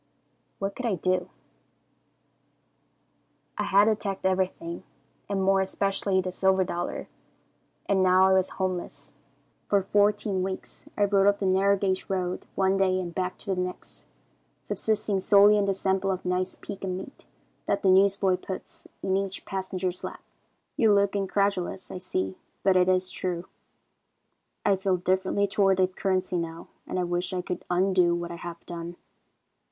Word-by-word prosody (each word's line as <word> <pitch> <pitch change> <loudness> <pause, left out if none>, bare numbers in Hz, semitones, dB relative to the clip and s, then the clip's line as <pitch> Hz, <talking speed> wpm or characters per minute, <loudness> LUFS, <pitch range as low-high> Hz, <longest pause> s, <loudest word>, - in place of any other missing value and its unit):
"What 195 0 -3
could 255 - -3
I 210 - +1
do? 185 +1 0 2.3
"I - - -2
had 200 +2 +5
attacked 205 -3 -1
everything, 185 -2 -1 0.5
and 195 -1 0
more 195 0 +3
especially 195 0 0
the 185 0 -4
silver 190 +1 +2
dollar, 175 -1 -4 0.8
and 195 -1 +2
now 185 0 +5
I 190 - +4
was 190 0 +3
homeless. 185 -2 -4 0.5
For 200 -2 +2
fourteen 205 0 +2
weeks 190 0 -6
I 205 - +3
rode 200 -1 +3
up 200 0 +4
the 200 - -3
narrow 195 +1 +3
gauge 190 -1 -1
road 185 -1 -2
one 190 0 +2
day 185 -1 +2
and 175 -2 -5
back 185 0 -2
the 195 -3 -3
next, 180 0 -6 0.6
subsisting 210 -2 -1
solely 205 +2 +6
on 200 - +2
the 195 - +1
sample 190 0 0
of 185 -1 -2
nice 180 +1 -1
pecan 190 -2 -5
meat 195 +9 -10 0.4
that 200 - 0
the 190 - +5
newsboy 195 -1 +4
puts 185 0 -9 0.2
in 190 - +1
each 195 0 -2
passenger's 185 -1 -3
lap. - - -7 0.5
"You 220 -3 +5
look 200 0 +2
incredulous, 195 -1 -1
I 185 - -5
see, 95 - -3 0.2
but 190 -1 +4
it 180 0 +4
is 185 0 +2
true. 180 -1 -3 1.2
"I 200 -1 +4
feel 190 -1 +1
differently 190 +3 +1
toward 195 -1 +2
the 185 -1 +4
currency 185 -1 -1
now, 165 0 -6 0.2
and - - -3
I 180 - +1
wish 175 +2 -2
I 180 -1 -2
could 180 - -5
undo 180 -1 +3
what 175 0 -4
I 170 - -6
have 170 0 -8
done. 170 0 -6
190 Hz, 160 wpm, -27 LUFS, 180-195 Hz, 2.3 s, solely